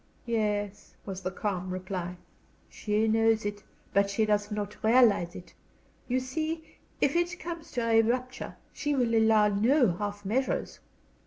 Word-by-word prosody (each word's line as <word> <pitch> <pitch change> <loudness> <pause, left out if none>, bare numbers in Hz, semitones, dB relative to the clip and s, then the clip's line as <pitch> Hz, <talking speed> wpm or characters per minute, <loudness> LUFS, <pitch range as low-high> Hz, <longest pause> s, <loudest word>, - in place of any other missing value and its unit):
"Yes," 210 -3 -2
was 190 -1 -5
the 185 - -2
calm 185 -1 -3
reply, 180 -1 -4 0.5
"she 215 +1 0
knows 225 -1 +3
it, 205 0 -3 0.3
but 200 0 +3
she 215 +2 +1
does 210 -1 +1
not 210 -1 -5
realize 220 -7 +4
it. 180 - -11 0.5
You 255 +1 +1
see, 315 +5 -4 0.2
if 285 - +2
it 345 +2 0
comes 335 -1 -6
to 235 -2 -1
a 225 0 +6
rupture 255 +3 -2 0.2
she 295 -1 -1
will 245 -3 +1
allow 220 -2 +5
no 230 - +3
half 205 0 -4
measures. 255 +7 -1
220 Hz, 150 wpm, -29 LUFS, 205-255 Hz, 0.5 s, a